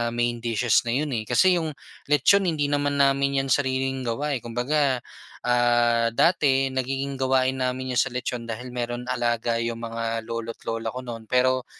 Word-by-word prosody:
main 120 0 0
dishes 115 +1 +1
na 115 - -1
'yon, 150 +3 0
eh, 110 -2 -2
kasi 185 - +4
yung 160 -3 -2 0.3
litson 185 +7 +4
hindi 150 -4 0
naman 145 -1 +1
namin 140 0 +2
'yan 135 - -5
sariling 130 -1 0
gawa, 140 +4 -1
eh. - - -12
Kumbaga, 130 +2 0 0.4
ah, 120 -1 +2
dati 135 -3 +3
nagiging 135 +1 -3
gawain 130 0 +1
namin 125 0 -2
yung - - +6
sa 125 - -2
litson 125 -1 -3
dahil 120 +2 -6
mayro'n 120 0 -4
alaga 120 -2 0
yung 115 0 -3
mga 115 0 -3
lolo't 115 0 -6
lola 115 0 -3
ko 130 - -5
no'n, 115 -3 -8
pero 130 0 +2
125 Hz, 175 wpm, -25 LUFS, 120-135 Hz, 0.4 s, yung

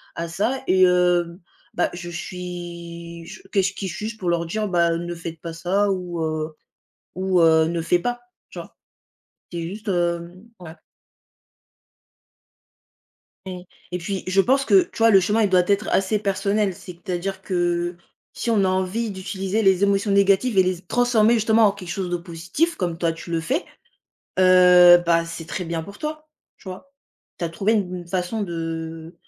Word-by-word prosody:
à 170 - -3
ça 215 +10 -1
et 185 0 +4
hem 180 -1 +2 0.3
bah, 175 - +1
je 175 0 -7
suis 170 -1 -7
je - - -11
qu'est-ce 195 -1 +1
qui 195 - -5
suis-je 215 +5 -5
pour 185 -5 -2
leur 170 0 0
dire: 215 +5 -2
«Bah 170 -2 +2
ne 175 0 -5
faites 165 -1 -8
pas 165 -1 -6
ça 185 +5 0
ou 180 -3 -3
heu 155 0 -3 0.6
ou 185 -1 +1
heu, 160 -1 +5
ne 170 0 -2
fais 175 +2 +2
pas». 245 +4 -3 0.3
Tu - - -10
vois? - - -12 0.8
C'est 170 - -3
juste, 205 +6 -7
hem 175 +1 -2 0.2
ouais. 160 -2 -10 2.7
Oui. 180 -1 -7 0.2
Et 180 - -2
puis 190 +2 -4
je 185 +1 +3
pense 270 +5 +2
que, 380 - +6
tu 345 - -11
vois, 225 0 +5
le 195 - +7
chemin, 210 +5 +1
il 205 - +3
doit 185 -1 +4
être 200 0 +1
assez 195 +2 +1
personnel, 200 0 0
c'est-à-dire 180 +1 -5
que, 175 -1 -1 0.4
si - - -5
on 210 -4 +3
a 190 - +2
envie 190 +5 -1
d'utiliser 190 +2 -3
les 190 -1 +3
émotions 200 +1 +2
négatives 200 +3 +3
et 190 - +7
les 185 0 0
z 175 - -13
transformer 240 -1 +3
justement 225 0 +3
en 200 - +3
quelque 190 -3 -10
chose 180 0 -3
de 175 - 0
positif 180 - -2
comme 175 -3 -2
toi 170 -1 0
tu 165 +1 -10
le 165 - 0
fais, 270 - -1 0.7
heu, 180 -1 +8
bah, 170 0 +3
c'est 165 -1 -7
très 170 +4 -4
bien 165 -1 -3
pour 200 +4 -11
toi, 305 0 -6 0.3
tu 190 - -13
vois? 190 +10 -9 0.5
Tu 170 - -3
as - - -1
trouvé 200 +6 0
une 180 -4 -2
façon 185 +4 -2
de, 165 -2 -5
180 Hz, 180 wpm, -22 LUFS, 170-200 Hz, 2.7 s, heu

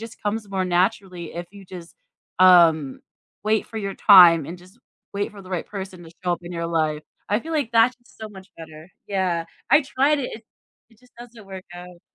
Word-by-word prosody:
just 225 0 -11
comes 210 0 -3
more 190 -1 -2
naturally 180 -2 -1
if 175 0 -6
you 200 -1 -13
just, 175 -2 -12 0.4
um, 165 -6 +5 0.4
wait 215 0 +1
for 225 - -11
your 195 -2 -4
time, 175 -7 +7
and 175 - -7
just 185 +6 -20 0.3
wait 200 +1 -3
for 200 -1 -12
the 185 - -14
right 180 -3 -3
person 190 -3 -8
to 160 - -13
show 180 - 0
up 175 - -4
in 175 - -9
your 170 -1 -3
life, 155 -2 -1 0.3
I 210 +3 +1
feel 325 - -8
like 285 -7 -1
that's 230 +2 +4
so 220 -1 -11
much 190 -2 -13
better. 160 0 -12 0.2
Yeah, 185 -4 -1 0.2
I 300 +2 +6
tried 275 +3 +1
it, 250 - -4
it 220 - -10 0.5
it 220 - -25
just 250 0 -25
doesn't 240 -3 -13
work 190 -1 -9
out. 175 0 -12
190 Hz, 205 wpm, -22 LUFS, 175-220 Hz, 0.5 s, time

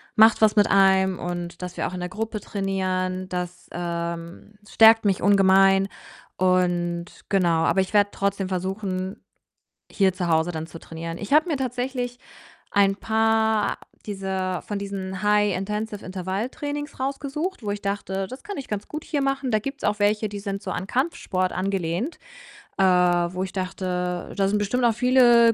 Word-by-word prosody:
macht 220 +1 +6
was 215 0 +5
mit 205 - +4
einem, 190 -1 +4
und, 175 0 -5
dass 180 0 -6
wir - - -1
auch - - -7
in 180 - -4
der 180 - -2
Gruppe 220 +1 -4
trainieren, 185 -2 -2
das, 180 0 -5
ähm 170 +2 -5
stärkt 225 0 +6
mich 195 -2 +2
ungemein 195 0 +5 0.5
und 175 -2 +1 0.3
genau, 170 -4 +2
aber 190 - +3
ich 190 - -4
werde 205 -1 +4
trotzdem 200 -1 -1
versuchen, 190 0 -3 0.7
hier 195 -2 +2
zu 185 -1 -2
Hause 160 +1 +2
dann 160 0 -4
zu 165 - -10
trainieren. 165 +1 -6
Ich 205 - -6
habe 310 +4 +5
mir 305 - 0
tatsächlich 250 -1 -3 0.5
ein 195 -1 +3
paar 220 0 +1 0.3
dieser 190 -3 -3
von 205 - -4
diesen 190 -1 -5
High 210 -2 +3
Intensive 210 +2 -4
Intervalltrainings 240 - -4
rausgesucht, 280 +4 -3
wo 205 - -2
ich 205 0 -4
dachte, 195 -1 -2
das 255 +1 -10
kann 405 - -6
ich 275 - -6
ganz 210 -1 -4
gut 305 0 -6
hier 290 -3 -1
machen. 275 -1 0
Da 215 - +3
gibt's 275 +5 -6
auch 210 0 0
welche, 210 +1 +2
die 205 0 -6
sind 200 -1 -4
so 190 - -4
an 185 - -4
Kampfsport 240 - -1
angelehnt, 190 - -2 0.6
äh, 195 - +3
wo 180 0 +3
ich 190 - -6
dachte, 180 -1 -3
da 195 -1 +2
sind 210 +1 +1
bestimmt 240 +5 0
auch 235 - +4
viele 240 -1 +5
195 Hz, 170 wpm, -24 LUFS, 185-220 Hz, 0.7 s, macht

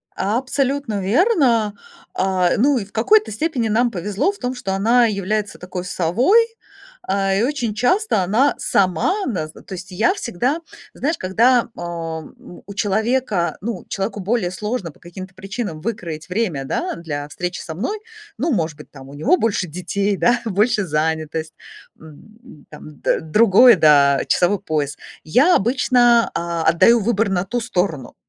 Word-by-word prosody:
Абсолютно 260 +1 -1
верно. 235 - +2 0.4
А, 185 - +1
ну, 270 +5 +3
и 215 - -3
в 200 - -21
какой-то 425 - +3
степени 250 0 -1
нам 235 +3 +2
повезло 200 - -1
в 405 - -14
том, 250 0 -2
что 195 -6 -4
она 230 +5 +3
является 210 0 -2
такой 180 0 -6
совой, 195 - +3 0.6
а, 195 0 0
и 195 +3 +1
очень 245 -5 -1
часто 305 - +1
она 225 +10 +2
сама 195 - +1
нас. 160 -10 -3
То - - -17
есть 185 +1 -8
я 265 - +2
всегда, 255 - -2 0.3
знаешь, 305 +4 -2
когда, 235 +7 +2
ам, 165 -2 -6
у 180 - -14
у 200 - -9
человека, 210 -4 0
ну 210 -3 -5
человеку 195 +2 -3
более 200 -2 0
сложно 210 -1 -4
по - - -25
каким-то 185 +2 -10
причинам 195 -3 -5
выкроить 170 -7 -5
время, 180 -9 -2
да, - - -2
для 145 -4 -5
встречи 180 +3 -4
со 160 - -7
мной. 400 - -3 0.4
Ну, 315 +6 0
может 160 -7 -2
быть 150 - -13
там, 135 -1 -13
у - - -12
него 265 - +2
больше 205 -5 0
детей, 190 +4 -2
да, 240 +4 +2
больше 215 0 +1
занятость, 160 0 -2 0.5
м, 185 - -16
там 150 -1 -12
д - - +1
другое, 215 +8 +6
да, 140 -3 +5
часовой 185 +3 +2
пояс. 150 -6 -2 0.3
Я 265 - +4
обычно, 240 +1 +3
а, 170 -1 -2
отдаю 200 +9 +5
выбор 220 0 +1
на 185 -1 -1
ту 245 +5 -2
сторону. 180 - -2
200 Hz, 155 wpm, -20 LUFS, 175-240 Hz, 0.6 s, другое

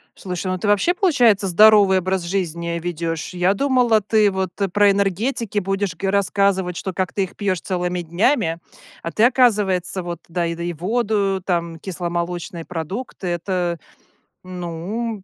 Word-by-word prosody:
Слушай, 180 0 -5
ну 185 - -1
ты 195 - -3
вообще, 205 - +3
получается, 245 - +3
здоровый 200 0 +6
образ 185 0 -1
жизни 170 -2 -2
ведешь? 165 -1 -4
Я 180 +2 +2
думала, 245 -2 +2
ты 210 0 +3
вот 190 -1 -2 0.2
про 205 -1 +5
энергетики 205 +3 -1
будешь 195 -1 -2
го 195 +3 -2
рассказывать, 195 -2 +1
что 190 +2 -4
как 185 0 -2
ты 195 - 0
их 190 - -7
пьешь 190 -4 -1
целыми 180 -1 -2
днями. 170 - +1 0.4
А 170 - -5
ты, 215 - +1
оказывается, 205 -8 +2
вот 175 0 -5
да 170 +1 -5 0.2
да 170 - -6
и 175 0 -2
воду, 200 +1 0
там 170 -2 -2
кисломолочные 175 -1 -4
продукты. 180 - -5
Это, 175 0 -1 0.7
ну, 185 +5 -5
190 Hz, 150 wpm, -21 LUFS, 175-205 Hz, 0.7 s, здоровый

